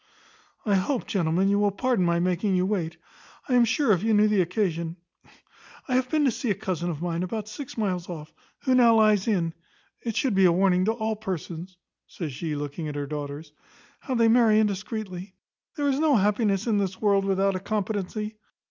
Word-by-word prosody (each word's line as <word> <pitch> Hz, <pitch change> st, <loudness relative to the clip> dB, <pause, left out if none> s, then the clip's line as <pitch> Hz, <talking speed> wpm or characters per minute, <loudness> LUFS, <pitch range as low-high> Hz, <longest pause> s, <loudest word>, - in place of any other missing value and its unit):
"I 210 Hz, -, +2 dB
hope, 205 Hz, +7 st, 0 dB
gentlemen, 180 Hz, 0 st, +1 dB
you 200 Hz, +1 st, +2 dB
will 205 Hz, 0 st, +3 dB
pardon 230 Hz, +1 st, 0 dB
my 170 Hz, -1 st, +2 dB
making 185 Hz, +3 st, +1 dB
you 180 Hz, 0 st, +2 dB
wait; 175 Hz, -5 st, -2 dB, 0.5 s
I 260 Hz, -, -1 dB
am 245 Hz, -1 st, +6 dB
sure 250 Hz, +2 st, +2 dB
if 180 Hz, -4 st, +3 dB
you 220 Hz, 0 st, +2 dB
knew 210 Hz, +1 st, +5 dB
the 210 Hz, -2 st, +3 dB
occasion 170 Hz, -2 st, -1 dB, 0.9 s
I 260 Hz, -, -2 dB
have 255 Hz, 0 st, +1 dB
been 305 Hz, 0 st, +2 dB
to 265 Hz, -, +3 dB
see 240 Hz, +2 st, -3 dB
a 205 Hz, -, +2 dB
cousin 185 Hz, -4 st, -3 dB
of 165 Hz, -1 st, -4 dB
mine, 170 Hz, -1 st, -2 dB
about 210 Hz, +3 st, -3 dB
six 245 Hz, +5 st, -8 dB
miles 185 Hz, -5 st, -2 dB
off, 155 Hz, -3 st, -8 dB, 0.3 s
who 260 Hz, -, +1 dB
now 240 Hz, -2 st, +6 dB
lies 215 Hz, -2 st, +4 dB
in. 170 Hz, -7 st, +1 dB, 0.5 s
It 230 Hz, -3 st, -4 dB
should 260 Hz, -5 st, +1 dB
be 195 Hz, -1 st, +4 dB
a 175 Hz, -, +6 dB
warning 185 Hz, +1 st, +3 dB
to 220 Hz, -, +2 dB
all 220 Hz, -1 st, -2 dB
persons 185 Hz, -3 st, -6 dB, 0.3 s
(says 155 Hz, -6 st, -6 dB
she, 150 Hz, +3 st, -3 dB
looking 145 Hz, +2 st, -4 dB
at 150 Hz, -, -5 dB
her 145 Hz, -1 st, -2 dB
daughters) 145 Hz, +1 st, -6 dB, 0.5 s
how 260 Hz, -, -4 dB
they 230 Hz, -1 st, +4 dB
marry 225 Hz, -2 st, +5 dB
indiscreetly. 200 Hz, -2 st, -3 dB, 0.4 s
There 290 Hz, -1 st, 0 dB
is 275 Hz, 0 st, +1 dB
no 310 Hz, -3 st, +4 dB
happiness 205 Hz, -1 st, +1 dB
in 220 Hz, -4 st, +2 dB
this 190 Hz, -2 st, -2 dB
world 200 Hz, -2 st, +3 dB
without 195 Hz, 0 st, +1 dB
a -, -, -2 dB
competency. 210 Hz, +1 st, -3 dB
195 Hz, 200 wpm, -26 LUFS, 175-220 Hz, 0.9 s, am